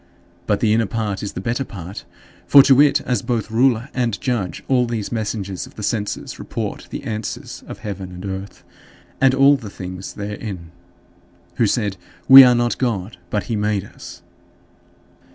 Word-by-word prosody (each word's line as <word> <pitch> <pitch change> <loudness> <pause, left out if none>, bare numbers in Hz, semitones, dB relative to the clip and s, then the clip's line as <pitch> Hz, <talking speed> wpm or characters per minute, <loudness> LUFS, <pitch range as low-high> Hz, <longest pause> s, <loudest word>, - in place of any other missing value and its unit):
But 105 - +1
the 110 -2 +3
inner 115 -1 +2
part 105 -1 -3
is 100 - -5
the - - -5
better 120 +6 -1
part; 95 -4 -9 0.4
for 140 -1 +8
to 135 0 +6
it, 145 0 +4
as 125 -5 -1
both 115 -3 -2
ruler 120 +1 +2
and 120 -5 -1
judge, 120 -8 -2
all 125 -2 +2
these 115 -3 -4
messengers 105 -4 -3
of - - -18
the 105 - -7
senses 105 -1 -3
report - - -5
the - - -6
answers 110 0 -5
of - - -8
heaven 95 -3 -6
and 90 +2 -8
earth 95 0 -7 0.6
and 135 0 +5
all 140 +1 +5
the 115 -6 -9
things 95 -1 -7
therein, 100 -4 -6 0.9
who 115 - +3
said, 100 -3 -1 0.3
"We 135 0 +12
are 125 -1 +5
not 120 0 0
God, 110 -5 -2
but 105 - -1
he 115 - -3
made 105 -2 0
us." - - -12
110 Hz, 170 wpm, -20 LUFS, 100-125 Hz, 0.9 s, We